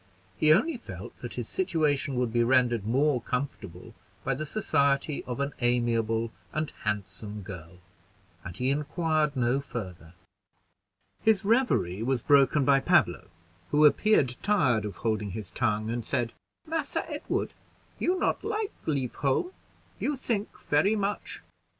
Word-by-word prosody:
He 155 - +4
only 275 - +3
felt 235 - -9
that - - -5
his - - -3
situation 150 - +1
would 125 -2 0
be 120 0 +3
rendered 120 -4 +2
more 135 +2 +2
comfortable 115 -6 -5 0.3
by 135 - 0
the 155 +4 -4
society 140 -7 +1
of 125 +1 -5
an 140 +1 -1
amiable 115 -2 +1 0.2
and 155 -1 -2
handsome 105 0 -3
girl, 90 -2 -9 0.7
and 90 +1 -4
he 130 +2 +2
inquired 150 0 0
no 125 +1 +2
further. 90 -10 -7 1.1
His 215 -3 +3
revery 210 - +2
was 125 0 0
broken 140 0 +4
by 140 0 +5
Pablo, 135 - +2 0.4
who 150 +1 +5
appeared 150 - +4
tired 140 - +2
of 100 -3 -5
holding 110 -2 -1
his 100 -1 -6
tongue, 110 0 0
and 120 0 -2
said, 115 +1 -1 0.3
"Massa 325 0 -2
Edward, - - -3 0.5
you 365 +1 +1
not - - 0
like 430 -1 -2
leave 135 -5 0
home 140 - 0 0.5
you 290 -1 -1
think 225 -5 -1 0.2
very 180 +9 +3
much. 205 0 -3
135 Hz, 140 wpm, -28 LUFS, 115-155 Hz, 1.1 s, by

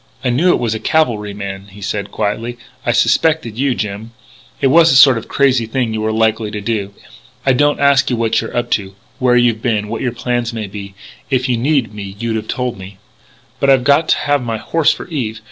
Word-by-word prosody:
"I 125 - +1
knew 155 +10 +2
it - - +4
was 115 -2 -1
a 110 - -4
cavalryman," 105 -9 -1
he 100 +1 -14
said 105 0 -3
quietly. 115 +4 -3 0.3
"I 120 - +1
suspected 150 -1 +2
you, 135 -2 +1
Jim. 105 +2 -5 0.5
It - - 0
was 165 0 +6
the 135 - +3
sort 130 0 +8
of - - -12
crazy 130 -5 +2
thing 115 -1 -1
you 110 - -2
were 110 0 0
likely 110 0 +1
to 105 - -5
do.... 100 -2 -3 0.5
I 135 - +4
don't 145 +3 +2
ask 140 -1 +3
you 125 - 0
what 115 -1 +1
you're 115 - -6
up 120 0 -2
to, 95 -2 -1 0.2
where 125 -1 +3
you've 120 -2 +2
been, 105 -4 -1
what 115 0 -4
your 125 - -1
plans 120 0 -2
may 110 -2 -4
be. 100 0 -9 0.3
If 130 -1 +1
you 125 - +1
needed 125 -3 0
me 100 -2 -7
you'd 115 -1 -2
have 110 - -6
told 125 -5 -3
me. 95 +1 -11 0.6
"But 140 - +2
I've 135 -2 +4
got 145 +4 +3
to - - +4
have 145 -1 0
my 115 -2 -3
horse 160 +7 +1
for - - -6
Eve. 120 -10 -4
115 Hz, 225 wpm, -16 LUFS, 105-130 Hz, 0.6 s, sort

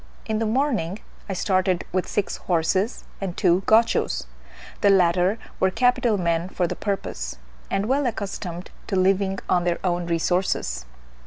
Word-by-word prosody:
In 220 -1 -1
the 225 - 0
morning 220 - 0 0.3
I - - -1
started 185 -1 +1
with 185 -1 0
six 205 - -1
horses 185 +6 0 0.2
and 185 -3 -4
two 180 0 +3
Gauchos: 225 +1 +3 0.6
the 200 - +5
latter 180 +1 +4 0.2
were 190 - +4
capital 240 +1 +2
men 170 -1 0
for 180 - 0
the - - -3
purpose, 175 - -3 0.3
and 195 - 0
well 270 +3 +1
accustomed 195 -5 -5 0.2
to 200 - -1
living 190 +1 +2
on 175 -1 +2
their 175 -1 +1
own 175 -2 0
resources. 165 - 0
190 Hz, 150 wpm, -24 LUFS, 175-210 Hz, 0.6 s, the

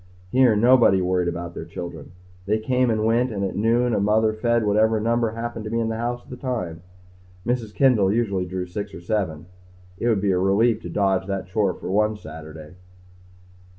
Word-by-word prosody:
Here, 130 -4 +4
nobody 115 -3 +5
worried 90 -1 0
about 85 0 -4
their - - -6
children. 85 -3 -8 0.3
They 105 +2 +2
came 125 +3 +1
and 110 -1 0
went 120 +3 +2
and 100 -2 -3
at 95 - -2
noon 115 +3 +2
a - - +2
mother 110 +2 +2
fed 115 +1 +1
whatever 110 +2 +3
number 115 0 0
happened 115 -1 -5
to - - -4
be 115 +1 -1
in 115 -1 0
the 110 - -3
house 120 +1 -3
at - - -17
the 125 - -7
time. 110 -11 -4 0.6
Mrs. 120 -3 -1
Kendall 115 -8 +4
usually 100 -5 0
drew 90 0 -4
six 100 +3 -6
or - - -9
seven. 85 -5 -2 0.5
It 120 - -1
would 110 -4 +2
be 100 -1 +2
a 90 - +1
relief 110 +4 +2
to - - -7
dodge 95 -2 0
the 100 -1 -2
chore 95 +1 0
for - - -6
one 105 +2 +2
Saturday.... 80 -2 -10
105 Hz, 200 wpm, -23 LUFS, 95-115 Hz, 0.6 s, nobody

